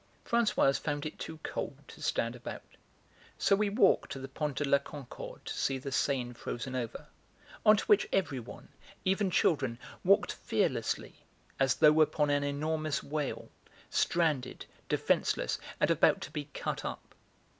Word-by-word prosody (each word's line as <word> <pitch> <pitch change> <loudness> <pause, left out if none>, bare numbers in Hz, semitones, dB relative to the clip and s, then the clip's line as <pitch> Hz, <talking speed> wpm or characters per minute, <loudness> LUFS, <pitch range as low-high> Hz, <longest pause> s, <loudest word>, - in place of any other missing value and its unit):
Françoise 215 -12 +3
found 145 0 -2
it 155 - -6
too 160 -1 -6
cold 135 - -4
to - - -13
stand 115 +1 0
about, 120 - -7 0.7
so 200 - +4
we 205 +1 +1
walked 200 -1 +3
to - - -4
the 135 0 -6
Pont 145 +1 -3
de 145 - +1
la 140 0 +5
Concorde 140 -2 -9
to - - -4
see 135 - 0
the 135 +1 -6
Seine 130 -2 0
frozen 120 +2 -5
over, 120 -3 -4 0.6
on 215 0 +7
to - - -2
which 210 -1 +4
everyone, 135 -11 -2 0.4
even 195 +1 +2
children, 135 -9 +2 0.3
walked - - +4
fearlessly, - - -1 0.4
as 135 -1 +3
though 155 0 +6
upon 150 -1 +3
an 145 0 +2
enormous 155 +2 -1
whale, 150 -1 -3 0.4
stranded, 155 -7 +1 0.2
defenceless, - - +1 0.2
and - - +3
about - - +4
to - - -6
be 150 -1 -4
cut 145 - -4
up. - - -6
145 Hz, 155 wpm, -31 LUFS, 135-160 Hz, 0.7 s, on